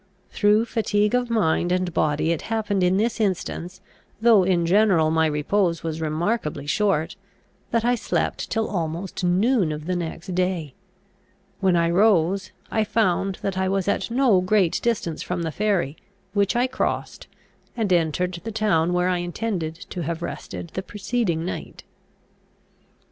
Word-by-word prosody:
Through 210 +2 +3
fatigue 210 -2 0
of 250 -1 +1
mind 175 -6 +1
and 180 -1 0
body, 155 +1 +1
it 165 - -1
happened 210 -3 0
in 180 +1 +3
this 225 +3 0
instance, 185 -2 -2 0.4
though 225 -3 +6
in 180 -2 +2
general 180 -4 +4
my 160 0 +3
repose 165 +4 0
was 160 -1 -3
remarkably 155 -1 -1
short, 190 -1 0 0.5
that 230 0 0
I 245 - +3
slept 235 - -2
till 225 -1 0
almost 170 0 -3
noon 190 +1 +2
of 150 0 -5
the 180 +1 -1
next 175 +2 -5
day. 180 -6 -1 0.9
When 190 -2 +3
I 170 0 +2
rose, 190 -1 +3 0.2
I 220 - +2
found 195 -3 +1
that 190 -1 -1
I 190 0 +1
was 195 -1 0
at - - 0
no 235 -6 +3
great 185 -2 +2
distance 205 -9 -1
from 175 -1 -3
the 160 - -2
ferry, 190 -7 0 0.4
which 200 0 +1
I 245 +1 +3
crossed, 260 - -3 0.5
and 210 -5 +1
entered 170 +1 0
the 225 - -4
town 185 -6 +1
where 180 0 +2
I 180 -1 +1
intended 175 -2 -3 0.2
to 180 - -4
have 170 +1 -3
rested 170 - -6
the 190 - -4
preceding 195 -4 -2
night. 180 - -6
185 Hz, 155 wpm, -23 LUFS, 170-210 Hz, 0.9 s, though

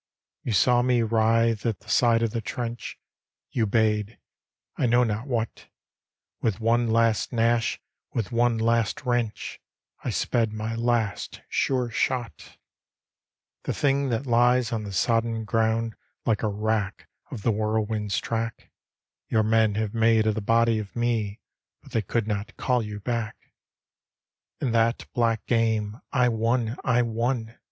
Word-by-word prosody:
" - - -68
You - - -2
saw 120 +4 +4
me 125 -1 +2
wridie 115 0 +2
at 115 -3 -1
the 105 - -22
side 115 0 +3
of 115 - 0
the 115 - -2
trench; 120 +1 -5 0.5
You 110 -3 +1
bade 105 0 +1 0.3
— - - -63
I 125 - +1
know 120 +1 +4
not 110 +2 -2
what; 115 -4 -3 0.7
Willi 110 -4 +1
one 115 +1 +2
last 115 -1 +2
gnash, 115 -1 +1 0.3
with 115 -3 -2
one 120 0 +2
last 115 -1 +1
wrench, 120 -3 -2 0.4
I - - -2
sped 115 -2 0
my 110 +1 -3
last, 115 -3 -1
sure 125 -3 0
shot 120 0 -2 0.5
" - - -63
The - - -1
diing 140 -1 +1
that 120 +3 -1
lies 120 0 +3
on 110 -2 -2
the 100 - -6
sodden 115 +3 +1
ground 115 +1 +1 0.3
Like 110 -3 +1
a 110 - +1
wrack 105 -1 -2 0.2
of 105 - -7
the 115 - +3
whirlwind's 110 -1 -1
track, 115 0 -4 0.6
Your 110 -1 +2
men 110 -1 +3
have 110 -1 -1
made 115 -1 +3
of 110 - +2
the 110 - -3
body 115 +1 +3
of 105 -2 -7
me. 115 -4 -1 0.4
But - - -15
they 115 - +1
could 110 +3 -1
not 105 +1 -3
call 125 -2 +1
you 105 -1 -6
back! 115 0 -4 0.5
" - - -66
In 130 - 0
that 115 +1 +2
black 115 -2 +1
game 110 -2 0
I 125 -2 +3
won, 115 0 0
I 125 -2 +3
won! 115 0 -2
115 Hz, 160 wpm, -26 LUFS, 110-120 Hz, 0.7 s, saw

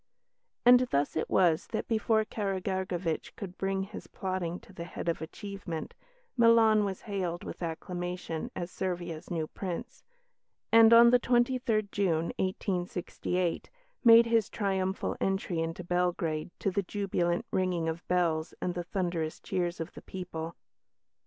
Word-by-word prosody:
And 245 0 +9
thus 140 +1 0
it 160 - -1
was 170 -4 +3
that, - - -3
before 220 -1 +2
Karageorgevitch 190 -5 -2
could 190 -3 -7
bring 195 0 -1
his 200 +2 -9
plotting 185 -2 -3
to 195 - -17
the 170 - -6
head 170 - -7
of 170 - 0
achievement, 185 -1 -6 0.4
Milan 230 -3 +6
was 190 -2 -4
hailed 185 -5 -3
with - - -8
acclamation 175 0 -4
as 175 0 -4
Servia's 175 -4 -4
new 165 -3 -1
Prince, 195 +9 -6 0.7
and, 225 0 +8
on 235 +1 +9
the 250 - +6
23rd 240 -4 +1
June, 170 -5 +1
1868, 180 -1 -2 0.3
made 230 -1 +9
his 230 -3 +2
triumphal 190 -2 -1
entry 195 -3 0
into 165 +2 -3
Belgrade 175 -3 0
to 195 - -1
the 200 +2 +1
jubilant 190 0 -1
ringing 180 -3 0
of 165 +1 -4
bells 170 -3 +1
and 180 - -1
the 175 0 -3
thunderous 175 -4 -2
cheers 175 -1 -2
of 165 +1 -5
the - - -10
people. 170 -3 -6
185 Hz, 140 wpm, -30 LUFS, 170-205 Hz, 0.7 s, And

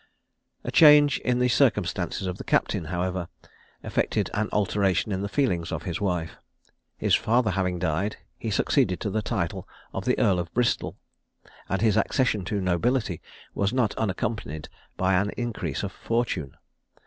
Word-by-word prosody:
A - - -4
change 150 -3 +7
in 125 -1 0
the 125 0 +3
circumstances 100 -8 +1
of 90 -1 -4
the - - -5
captain, 80 - +1
however, 90 +1 -2 0.6
effected - - -1
an 105 +1 -1
alteration 100 -1 +1
in 95 -1 -1
the 100 - -3
feelings 90 - 0
of - - -3
his 90 -1 -4
wife. 90 -5 -2 0.6
His - - 0
father 115 -1 +3
having 90 -1 -1
died, 90 +5 -1 0.2
he 115 - -3
succeeded 100 - +1
to 105 - -2
the 110 +2 0
title - - -3 0.3
of - - -4
the - - +2
Earl 95 -3 +3
of 85 -1 -4
Bristol, 120 -1 0 0.7
and 95 +3 0
his 110 -2 +3
accession 110 -2 +1
to 100 +2 -1
nobility 95 - 0 0.3
was 100 0 0
not 125 -5 +1
unaccompanied 95 - -3 0.3
by 95 +1 +2
an 100 +3 +2
increase 120 -3 -3
of 100 - -3
fortune. 115 - -2
100 Hz, 160 wpm, -26 LUFS, 90-115 Hz, 0.7 s, change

